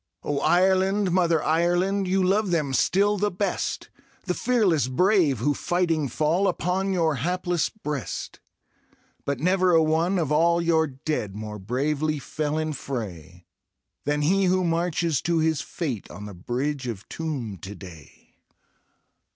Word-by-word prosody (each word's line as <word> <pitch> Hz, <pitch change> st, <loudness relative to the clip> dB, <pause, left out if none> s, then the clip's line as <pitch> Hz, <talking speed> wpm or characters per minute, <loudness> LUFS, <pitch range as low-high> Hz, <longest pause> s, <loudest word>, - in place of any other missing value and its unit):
Oh 145 Hz, -1 st, -1 dB
Irelandj 190 Hz, +3 st, +3 dB
Mother 170 Hz, -3 st, +2 dB
Ireland] 175 Hz, +5 st, +1 dB
You 190 Hz, +1 st, +2 dB
love 195 Hz, +2 st, +2 dB
them 155 Hz, -6 st, 0 dB
still 200 Hz, +8 st, +2 dB
the 210 Hz, +1 st, +2 dB
best| 200 Hz, +1 st, -3 dB, 0.3 s
The 180 Hz, -, -1 dB
fearless 195 Hz, -, +2 dB
brave 175 Hz, -, +3 dB
who 140 Hz, +7 st, +1 dB
fighting 165 Hz, -3 st, 0 dB
fall 155 Hz, -, +1 dB
Upon 190 Hz, +2 st, 0 dB
your 165 Hz, -5 st, +1 dB
hapless 175 Hz, +3 st, 0 dB
breast; 150 Hz, -, -5 dB, 0.9 s
But 140 Hz, -3 st, -2 dB
never 185 Hz, +3 st, +3 dB
a 160 Hz, -, +5 dB
one 165 Hz, +5 st, +1 dB
of 160 Hz, -5 st, -1 dB
all 170 Hz, +3 st, +3 dB
your 165 Hz, -2 st, +2 dB
dead 130 Hz, -7 st, -4 dB
More 105 Hz, 0 st, -6 dB
bravely 145 Hz, +8 st, -1 dB
fell 150 Hz, +1 st, -3 dB
in 155 Hz, -1 st, -1 dB
frayi 90 Hz, -, -6 dB, 0.6 s
Than 145 Hz, +1 st, 0 dB
he 190 Hz, +5 st, +3 dB
who 185 Hz, 0 st, +2 dB
marches 170 Hz, -3 st, 0 dB
to 170 Hz, -1 st, 0 dB
his 160 Hz, -2 st, +1 dB
fate 135 Hz, -, -4 dB
On 100 Hz, +3 st, -9 dB
the 105 Hz, -, -8 dB
Bridge 125 Hz, +8 st, -3 dB
of 110 Hz, -4 st, -6 dB
Toome 130 Hz, -, -5 dB
to 100 Hz, +2 st, -7 dB
day. 85 Hz, -8 st, -14 dB
160 Hz, 145 wpm, -25 LUFS, 135-180 Hz, 0.9 s, a